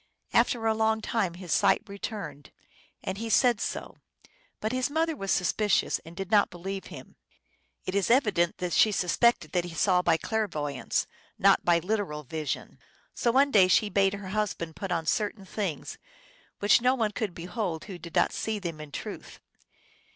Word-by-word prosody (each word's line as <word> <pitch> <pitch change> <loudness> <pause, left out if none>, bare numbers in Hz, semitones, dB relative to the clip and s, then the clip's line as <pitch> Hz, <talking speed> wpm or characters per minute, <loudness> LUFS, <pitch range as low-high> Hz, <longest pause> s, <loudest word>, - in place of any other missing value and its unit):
After 230 -3 +2
a 220 - +3
long 220 0 +1
time 205 -5 -1
his 180 -2 -8
sight - - +3
returned, 200 - -7 0.5
and 190 +1 -4
he 225 0 -4
said 235 0 +4
so; - - -4 0.6
but 215 - -2
his 255 +2 0
mother 320 +2 0
was 195 -7 -6
suspicious, 205 +3 +2
and 165 +1 -13
did 195 +1 -6
not 205 -2 +5
believe 190 +2 -6
him." - - -11 0.7
It 185 - -3
is 200 -3 +1
evident 210 -9 +3
that 180 -1 -3
she 215 - +5
suspected 210 +5 +2
that 180 -1 0
he 170 -2 -8
saw 180 +1 +3
by 170 -2 +3
clairvoy 165 -10 -2
ance, - - -1 0.3
not 195 0 +4
by 175 -1 +4
literal 180 -4 -2
vision. 150 0 -5 0.2
" - - -36
So 235 - +1
one 275 +3 +4
day 195 -6 +6
she 210 +3 +3
bade 195 0 +2
her 200 -2 -8
husband 190 -6 -2
put 190 +2 -5
on 165 -2 -1
certain 205 +3 -1
things 190 -6 -4 0.6
which 205 +3 +4
no 250 +2 +3
one 225 -4 0
could 210 -4 -3
behold 175 -1 -4
who 190 -4 -8
did 170 0 -10
not - - +3
see 220 -1 -2
them 170 -6 -5
in 150 -1 -10
truth. - - -7
195 Hz, 180 wpm, -28 LUFS, 175-220 Hz, 0.7 s, day